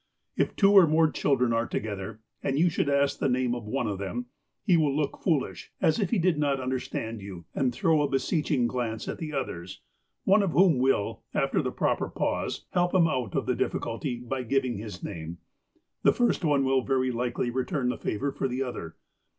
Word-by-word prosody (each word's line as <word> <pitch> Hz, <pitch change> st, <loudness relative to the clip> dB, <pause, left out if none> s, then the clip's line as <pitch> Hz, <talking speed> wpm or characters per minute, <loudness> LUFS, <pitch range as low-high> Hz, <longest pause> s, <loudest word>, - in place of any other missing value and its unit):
If -, -, 0 dB
two 195 Hz, -1 st, +5 dB
or 190 Hz, -4 st, +9 dB
more 160 Hz, 0 st, +3 dB
children 125 Hz, -4 st, +1 dB
are 115 Hz, +1 st, +1 dB
together, 105 Hz, 0 st, -4 dB, 0.2 s
and 135 Hz, -, -1 dB
you 175 Hz, +3 st, +4 dB
should 150 Hz, -, 0 dB
ask 140 Hz, 0 st, +2 dB
the -, -, +1 dB
name 125 Hz, -1 st, +1 dB
of 120 Hz, -3 st, -5 dB
one 125 Hz, +2 st, -1 dB
of 100 Hz, -3 st, -3 dB
them, 120 Hz, +6 st, -4 dB, 0.4 s
he 185 Hz, -5 st, +4 dB
will 150 Hz, -4 st, +2 dB
look 145 Hz, -2 st, -1 dB
foolish, 155 Hz, -7 st, -1 dB
as 160 Hz, -, +2 dB
if 200 Hz, -, 0 dB
he 235 Hz, -, +1 dB
did 175 Hz, -3 st, +2 dB
not 140 Hz, -2 st, +1 dB
understand 125 Hz, -4 st, -3 dB
you, 95 Hz, -4 st, -9 dB
and 135 Hz, -, 0 dB
then 125 Hz, -, +2 dB
throw 155 Hz, +5 st, +2 dB
a 145 Hz, -, +1 dB
beseeching 135 Hz, -1 st, +1 dB
glance 120 Hz, -2 st, -2 dB
at -, -, -4 dB
the 155 Hz, -2 st, -4 dB
others, 95 Hz, -, -5 dB, 0.4 s
one 195 Hz, +2 st, +5 dB
of 195 Hz, -4 st, 0 dB
whom 175 Hz, -7 st, +5 dB
will, 130 Hz, -6 st, +1 dB
after -, -, +1 dB
the -, -, -2 dB
proper -, -, 0 dB
pause, -, -, -2 dB
helx^ 175 Hz, 0 st, +1 dB
him 175 Hz, -3 st, +6 dB
out 125 Hz, -, -2 dB
of -, -, 0 dB
the -, -, +1 dB
difiiculty 120 Hz, 0 st, -3 dB
by 130 Hz, +1 st, -2 dB
giving 125 Hz, -2 st, 0 dB
his 105 Hz, -4 st, -8 dB
name. 85 Hz, +1 st, -6 dB, 0.6 s
The -, -, +5 dB
first 240 Hz, -6 st, +1 dB
one 145 Hz, -4 st, +3 dB
will 130 Hz, 0 st, +3 dB
very 130 Hz, 0 st, +1 dB
likely 120 Hz, 0 st, -1 dB
return 130 Hz, +1 st, -1 dB
the 125 Hz, -, -1 dB
favour 140 Hz, +7 st, -2 dB
for 135 Hz, -, -2 dB
the 130 Hz, +1 st, -2 dB
other. 110 Hz, -11 st, -6 dB
130 Hz, 205 wpm, -27 LUFS, 120-150 Hz, 0.6 s, or